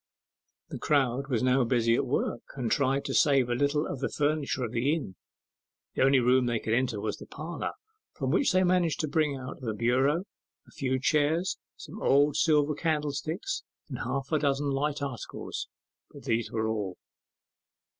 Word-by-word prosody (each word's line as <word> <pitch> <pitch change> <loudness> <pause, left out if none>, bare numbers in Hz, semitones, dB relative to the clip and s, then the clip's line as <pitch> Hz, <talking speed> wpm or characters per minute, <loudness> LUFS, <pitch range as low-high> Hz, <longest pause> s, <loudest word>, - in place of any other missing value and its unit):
The - - -6
crowd 135 -2 +1
was 125 -2 0
now 130 +1 +4
busy 115 -1 +2
at 125 - +1
work, 130 - -1
and 125 -4 -2
tried 140 0 +1
to - - -2
save 135 -5 +4
a - - +1
little 145 +4 +1
of 135 - -4
the 135 - -1
furniture 145 -3 0
of 115 - -3
the 130 +6 +1
inn. 135 - -6 0.8
The - - -2
only 135 0 +5
room 125 +1 +3
they 120 -1 +1
could 110 0 -2
enter 120 -3 +1
was 110 - -3
the - - -11
parlour, 160 +4 -5 0.4
from - - -2
which 280 - +3
they 185 0 +3
managed 180 -3 +2
to 155 - -1
bring 150 -2 +1
out 130 +1 -8
the 110 -4 -3
bureau, 130 - +2 0.4
a - - -18
few 130 -1 -1
chairs, 155 +7 +1 0.2
some 215 - -10
old 145 +1 +4
silver 150 -2 +3
candlesticks, 155 - -2 0.3
and 130 -4 -5
half 135 +3 -3
a 155 - +3
dozen 140 0 +1
light 145 +1 -1
articles; 135 -4 -5 0.4
but - - -13
these 115 0 -1
were 110 -1 -1
all. 105 -5 -3
135 Hz, 180 wpm, -28 LUFS, 125-150 Hz, 0.8 s, only